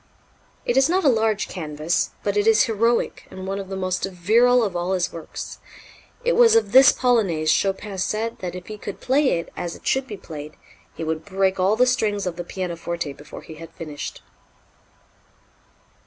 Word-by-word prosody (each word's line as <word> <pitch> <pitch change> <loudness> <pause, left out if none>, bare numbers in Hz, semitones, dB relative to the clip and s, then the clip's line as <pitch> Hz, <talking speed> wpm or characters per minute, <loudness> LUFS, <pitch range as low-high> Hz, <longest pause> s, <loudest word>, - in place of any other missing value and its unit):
It 240 - +1
is 270 +3 +5
not 370 +2 +2
a - - +4
large 220 -3 +1
canvas, 155 -1 -2
but - - -1
it 415 +1 +2
is 445 -1 +6
heroic 230 +1 0
and 190 0 -8
one 195 +1 -3
of 195 -1 -7
the 195 - -4
most 185 -1 -2
virile 225 +7 +3
of 195 -5 -2
all 175 +2 -1
his 180 -1 -1
works. 165 -2 -7 0.7
It - - +3
was 465 -2 +6
of 455 - +3
this 270 +2 +8
polonaise 195 -11 +2
Chopin 195 +2 -1
said 220 +4 -2
that 180 -1 -5
if 180 0 -8
he 215 -1 -8
could 205 - -7
play 265 - +2
it 170 - -7
as 170 -1 -4
it - - -16
should 265 0 +1
be 210 - -7
played, 150 -4 -9 0.4
he - - -5
would 160 0 -2
break 190 +1 0
all 190 +3 +3
the 250 +3 +4
strings 215 -5 0
of 180 -2 -3
the 175 - -5
pianoforte 170 -4 -4
before 145 - -11
he 160 - -10
had 165 - -9
finished. 150 -3 -7
195 Hz, 190 wpm, -23 LUFS, 170-235 Hz, 0.7 s, this